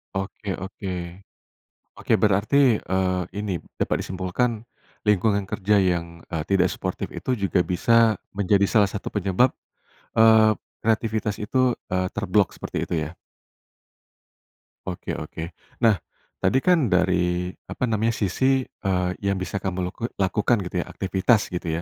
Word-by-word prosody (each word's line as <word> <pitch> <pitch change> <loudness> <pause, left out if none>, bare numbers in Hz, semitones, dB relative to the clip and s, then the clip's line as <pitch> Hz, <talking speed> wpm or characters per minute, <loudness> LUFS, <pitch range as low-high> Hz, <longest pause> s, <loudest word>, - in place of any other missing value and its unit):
Oke 95 +1 -4
oke, 95 +1 -6 1.1
oke - - -2
berarti, 105 +6 +2 0.2
eee, 95 -2 0 0.2
ini 100 -4 -2 0.2
dapat - - +1
disimpulkan, 95 +5 -1 0.5
lingkungan 100 -1 +2
kerja 100 +1 +2
yang, 85 -2 -1
eee, 80 -3 -3
tidak 95 -1 +3
suportif 95 -1 -4
itu 130 - -2
juga 100 -6 +1
bisa 115 +3 +3 0.2
menjadi 100 0 +3
salah 105 -3 +3
satu 100 - -4
penyebab, 100 +5 +1 0.6
eee, 110 -1 +6 0.2
kreativitas 110 -2 0
itu, 125 +3 +1 0.2
eee, 95 0 +1
terblok 100 -2 +2
seperti - - -5
itu - - -2
ya? 80 +2 -3 1.7
Oke - - -4
oke. 80 +2 -6 0.3
Nah, 110 -7 +5 0.4
tadi 130 - +3
kan, 175 -8 +4
dari, 90 -1 +1 0.2
apa - - -5
namanya, 115 -1 +1
sisi, 130 +7 +1
eee, 90 -6 -2
yang 100 -1 0
bisa 95 +2 -3
kamu 95 -1 -2
laku 115 - -4
lakukan, 105 +5 +2
gitu 90 - -7
ya, - - -19
aktivitas, 95 +4 +1
gitu 90 -1 -4
100 Hz, 130 wpm, -24 LUFS, 90-110 Hz, 1.7 s, eee